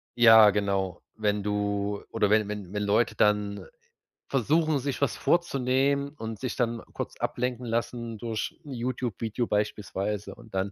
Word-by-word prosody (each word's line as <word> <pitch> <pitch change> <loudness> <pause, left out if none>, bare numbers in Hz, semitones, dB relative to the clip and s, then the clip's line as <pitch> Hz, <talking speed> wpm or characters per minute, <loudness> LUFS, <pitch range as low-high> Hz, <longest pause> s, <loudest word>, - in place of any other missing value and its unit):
ja 110 -3 +8
genau, 95 -3 -1
wenn 105 -2 0
du 100 0 -1
oder 105 - +1
wenn 105 -1 +3
wenn 105 -2 -6
wenn 105 0 -1
Leute 105 +2 +2
dann 105 -1 +1 0.6
versuchen, 150 +3 +2
sich 140 0 -3
was 140 - +1
vorzunehmen 140 -3 +1
und 110 -2 -6
sich 130 - -3
dann 115 -1 -1
kurz - - -5
ablenken 125 0 -2
lassen 115 0 -2
durch 115 -1 -4
'n 140 - -7
YouTube 120 -3 -3
Video 115 +2 -1
beispielsweise 105 0 -2
und 115 -3 -16
dann 95 +2 -1
110 Hz, 150 wpm, -27 LUFS, 105-125 Hz, 0.6 s, ja